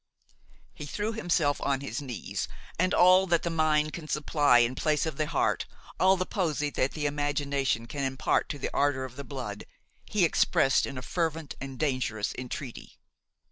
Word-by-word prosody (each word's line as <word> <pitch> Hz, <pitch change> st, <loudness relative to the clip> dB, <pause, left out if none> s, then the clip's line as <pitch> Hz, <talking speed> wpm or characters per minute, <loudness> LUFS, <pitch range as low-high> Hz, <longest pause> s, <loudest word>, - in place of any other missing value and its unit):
He 150 Hz, -, -8 dB
threw 210 Hz, +9 st, -2 dB
himself 170 Hz, -8 st, +1 dB
on 135 Hz, -1 st, 0 dB
his 135 Hz, -2 st, -4 dB
knees, 125 Hz, -6 st, -4 dB, 0.3 s
and 185 Hz, +1 st, +2 dB
all 185 Hz, +2 st, +6 dB
that 170 Hz, -2 st, +2 dB
the 170 Hz, -, -1 dB
mind 155 Hz, -1 st, +2 dB
can 165 Hz, -3 st, -7 dB
supply 150 Hz, -3 st, +3 dB
in 120 Hz, +1 st, +3 dB
place 150 Hz, +3 st, +1 dB
of 155 Hz, -4 st, -4 dB
the 155 Hz, -, 0 dB
heart, -, -, 0 dB, 0.3 s
all 190 Hz, +1 st, +5 dB
the 185 Hz, -, -1 dB
poesy 155 Hz, -7 st, -1 dB
that 130 Hz, -, 0 dB
the 150 Hz, -2 st, -3 dB
imagination 145 Hz, -4 st, 0 dB
can 140 Hz, +4 st, -4 dB
impart 130 Hz, 0 st, 0 dB
to 145 Hz, -, -3 dB
the -, -, -4 dB
ardor 140 Hz, -2 st, +1 dB
of 125 Hz, -1 st, -10 dB
the 140 Hz, -, -6 dB
blood, 125 Hz, -8 st, -6 dB, 0.4 s
he 200 Hz, -4 st, +2 dB
expressed 135 Hz, -4 st, +3 dB
in 135 Hz, -, -6 dB
a 130 Hz, -, -5 dB
fervent 160 Hz, -4 st, -2 dB
and 135 Hz, -1 st, -6 dB
dangerous 130 Hz, -8 st, -1 dB
entreaty. 125 Hz, 0 st, -7 dB
145 Hz, 180 wpm, -28 LUFS, 130-160 Hz, 0.4 s, all